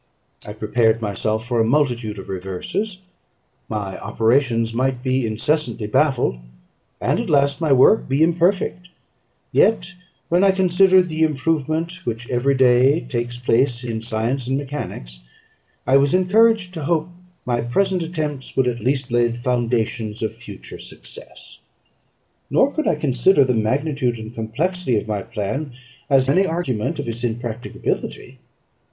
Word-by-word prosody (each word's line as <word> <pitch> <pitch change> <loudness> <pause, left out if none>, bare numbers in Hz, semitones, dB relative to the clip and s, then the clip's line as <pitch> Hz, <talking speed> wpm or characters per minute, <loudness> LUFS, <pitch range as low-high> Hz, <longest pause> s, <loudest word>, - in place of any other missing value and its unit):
I 105 - -6
prepared 110 +1 +1
myself 110 +1 -2
for 120 -1 -1
a - - +4
multitude 120 -4 0
of 95 - -9
reverses; 95 - -4 0.7
my 100 -3 -4
operations 115 -1 +1
might 130 +1 -1
be 130 -2 0
incessantly 120 +2 -1
baffled, 125 - +1 0.6
and - - 0
at - - -3
last 140 +2 +2
my 155 -3 +1
work 135 +8 +5
be 140 +4 +3
imperfect: 175 +2 +1 0.6
yet, 175 -6 +2 0.3
when 175 +2 +2
I 195 -1 +5
considered 185 0 +4
the 160 -1 -4
improvement 160 +3 -1
which 120 -3 -4
every 130 +3 +1
day 130 +4 +4
takes 120 -1 -4
place 120 0 +1
in 115 -2 -4
science 120 +3 -2
and 135 +1 0
mechanics, 135 - -6 0.7
I 135 - +5
was 140 +4 +3
encouraged 200 +1 +3
to 160 -5 -5
hope 165 +1 0 0.4
my 120 -1 0
present 185 +9 0
attempts 155 -6 -4
would 130 -1 +3
at 120 -1 -1
least 130 +2 -1
lay 120 0 +3
the 120 0 -5
foundations 120 -3 -1
of 110 0 -2
future 105 -4 -11
success. - - -13 0.9
Nor 275 +2 +3
could 310 - -1
I - - +3
consider 145 +2 +3
the 125 - +1
magnitude 125 +2 0
and 110 +1 -9
complexity 130 +5 -1
of 105 - -3
my 105 -2 -2
plan 115 +6 -4 0.4
as 135 -2 +4
any 185 +8 +3
argument 160 -10 -2
of - - -4
its 115 +1 -5
impracticability. 120 0 -4
130 Hz, 145 wpm, -21 LUFS, 115-160 Hz, 0.9 s, work